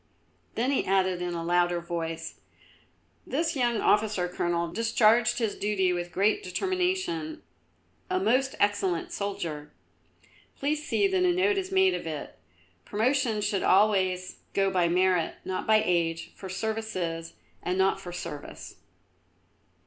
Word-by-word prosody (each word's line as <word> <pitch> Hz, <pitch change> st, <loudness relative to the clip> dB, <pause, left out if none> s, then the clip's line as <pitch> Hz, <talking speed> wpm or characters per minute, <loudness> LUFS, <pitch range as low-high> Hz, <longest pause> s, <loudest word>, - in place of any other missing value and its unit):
Then 250 Hz, +4 st, +1 dB
he 275 Hz, -, +1 dB
added 185 Hz, -2 st, +1 dB
in 175 Hz, -1 st, -2 dB
a 165 Hz, -, -3 dB
louder 175 Hz, 0 st, +2 dB
voice: 165 Hz, -1 st, -5 dB, 0.9 s
"This 320 Hz, +5 st, -1 dB
young 240 Hz, -4 st, +1 dB
officer, 210 Hz, -4 st, +2 dB
Colonel, 175 Hz, -1 st, -1 dB
discharged 225 Hz, +3 st, +3 dB
his 225 Hz, -4 st, 0 dB
duty 190 Hz, -3 st, +1 dB
with 175 Hz, 0 st, -4 dB
great 205 Hz, +3 st, +2 dB
determination, 360 Hz, -, -2 dB, 0.7 s
a 370 Hz, 0 st, +1 dB
most 265 Hz, -4 st, +1 dB
excellent 200 Hz, -4 st, +1 dB
soldier. 170 Hz, -7 st, -4 dB, 0.9 s
Please 295 Hz, +2 st, -1 dB
see 395 Hz, +6 st, +2 dB
that 380 Hz, -1 st, +1 dB
a 360 Hz, -, +4 dB
note 390 Hz, +3 st, +2 dB
is 380 Hz, 0 st, -5 dB
made 380 Hz, -1 st, +4 dB
of -, -, -4 dB
it. 155 Hz, -2 st, -6 dB, 0.5 s
Promotion 235 Hz, 0 st, +1 dB
should 205 Hz, -1 st, 0 dB
always 185 Hz, -2 st, +2 dB, 0.2 s
go 195 Hz, -1 st, +2 dB
by 180 Hz, -2 st, +2 dB
merit, 180 Hz, -1 st, +2 dB
not 185 Hz, -, -3 dB
by 215 Hz, -1 st, +5 dB
age, 165 Hz, -2 st, 0 dB
for 190 Hz, -, -9 dB
services 185 Hz, -5 st, -3 dB, 0.3 s
and 180 Hz, +1 st, -2 dB
not 195 Hz, 0 st, +2 dB
for 180 Hz, -, -7 dB
service. 150 Hz, -4 st, -8 dB
195 Hz, 135 wpm, -28 LUFS, 175-235 Hz, 0.9 s, by